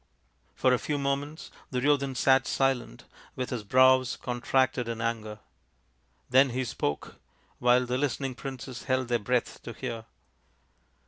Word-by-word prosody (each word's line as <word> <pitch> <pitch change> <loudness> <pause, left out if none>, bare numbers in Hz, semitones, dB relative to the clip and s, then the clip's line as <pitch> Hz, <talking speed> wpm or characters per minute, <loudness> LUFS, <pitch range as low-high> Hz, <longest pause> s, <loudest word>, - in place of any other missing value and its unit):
For 130 - +3
a 125 - +2
few 150 - -2
moments 140 +2 -3 0.2
Duryodhan 140 +1 +1
sat 130 +1 +3
silent, 135 - 0 0.3
with 130 -1 -4
his 120 -4 -3
brows 130 +3 +4
contracted 125 0 0
in 115 -1 -4
anger. 110 -2 -3 0.9
Then 130 +2 +5
he 130 +1 -2
spoke, 75 -10 -3 0.4
while 125 +1 +4
the 125 +1 -1
listening 135 -1 -1
princes 130 -1 -7
held 130 -2 0
their 120 -1 +2
breath 120 +3 -1
to - - -8
hear. 115 -1 -5
130 Hz, 135 wpm, -28 LUFS, 120-135 Hz, 0.9 s, Then